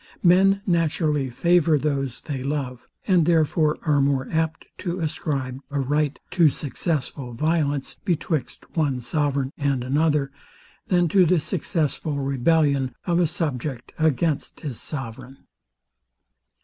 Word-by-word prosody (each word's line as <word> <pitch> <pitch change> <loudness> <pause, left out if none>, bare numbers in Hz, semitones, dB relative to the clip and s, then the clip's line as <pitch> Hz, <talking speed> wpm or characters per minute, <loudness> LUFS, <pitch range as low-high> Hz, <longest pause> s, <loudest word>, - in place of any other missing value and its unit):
Men 195 +2 +5
naturally 155 -5 +1
favour 170 +4 +3
those 135 -3 -2
they 140 -4 -4
love; 135 -3 -3 0.2
and 180 -5 +3
therefore 155 -2 +3
are 145 -3 +3
more 135 -1 +1
apt 160 0 -1
to 180 -1 -3
ascribe 140 -5 -2
a 140 -1 -2
right 145 +2 0
to 170 -4 +5
successful 140 -3 -3
violence, 145 -1 0
betwixt 165 - -2
one 145 -6 +1
sovereign 140 +1 0
and 140 -3 0
another, 145 +1 +1 0.6
than 175 -2 +3
to 185 0 +5
the 180 +1 +4
successful 155 -2 -1
rebellion 140 -1 +1
of 175 -1 +2
a 175 - +3
subject 140 -5 -3
against 155 -1 0
his 135 -7 -5
sovereign. 130 -1 -8
150 Hz, 125 wpm, -24 LUFS, 135-165 Hz, 0.6 s, Men